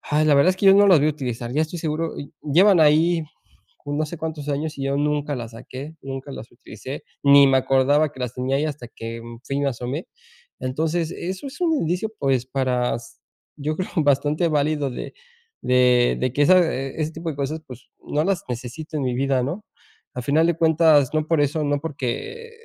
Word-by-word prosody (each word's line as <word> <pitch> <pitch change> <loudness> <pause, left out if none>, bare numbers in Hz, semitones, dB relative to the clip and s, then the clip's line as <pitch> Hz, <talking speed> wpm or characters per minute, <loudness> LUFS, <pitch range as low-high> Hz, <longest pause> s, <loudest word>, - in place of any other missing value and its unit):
ay, 150 +1 +1
la 150 - +5
verdad 140 +6 +5
es 185 - -3
que 195 - 0
yo 195 - +8
no 200 0 +6
las 180 -5 +7
voy 150 - +3
a - - +3
utilizar, 120 -4 -5
ya 150 +4 +2
estoy 160 +2 -4
seguro. 160 0 -3
Y 140 - -8
llevan 175 +5 +5
ahí 160 +2 +4 0.6
no 145 +2 -1
sé 170 - -7
cuántos 155 -2 -5
años 150 +1 -3
y 135 - -3
yo 140 0 0
nunca 145 -1 -1
las 115 -1 -7
saqué, 130 +7 -9
nunca 135 +1 -7
las 110 -3 -9
utilicé, 120 +3 -9 0.2
ni 140 0 +8
me 135 0 +4
acordaba 135 +3 +2
que 130 - -12
las 125 -1 -3
tenía 130 +2 -1
ahí 145 - 0
hasta 145 -5 -6
que, 115 0 -7
mm, 115 0 -11
fui 135 - -3
y 140 - 0
me 140 - +1
asomé. 130 - -4 0.5
Entonces, 160 +6 -1
eso 185 +8 -5
es 275 - -12
un 330 -2 +2
indicio, 180 - -1
pues, 130 -2 0
para 130 -3 0
s 120 - -12 0.5
yo 155 +1 -1
creo 185 - -4
bastante 150 +3 +2
válido 150 -1 0
de 125 - -7 0.5
de 125 -1 +3
de 130 -1 0
que 145 - +1
esa, 185 +5 +6
eh, 135 -5 -2
ese 155 - -2
tipo 165 +1 -6
de 145 - -7
cosas, 150 +3 -3
pues, 125 -2 -13
no 150 +2 -1
las 190 -4 0
necesito 130 +6 -6
en 145 - -1
mi 125 -1 -1
vida, 135 0 +1
¿no? 170 +12 -4 0.5
A 125 - -4
final 155 +5 +3
de 170 - +1
cuentas, 160 -4 +4
no 155 0 0
por 165 -3 +2
eso 150 +2 0
no, 145 0 +1
porque 160 - -5
145 Hz, 215 wpm, -22 LUFS, 130-160 Hz, 0.6 s, yo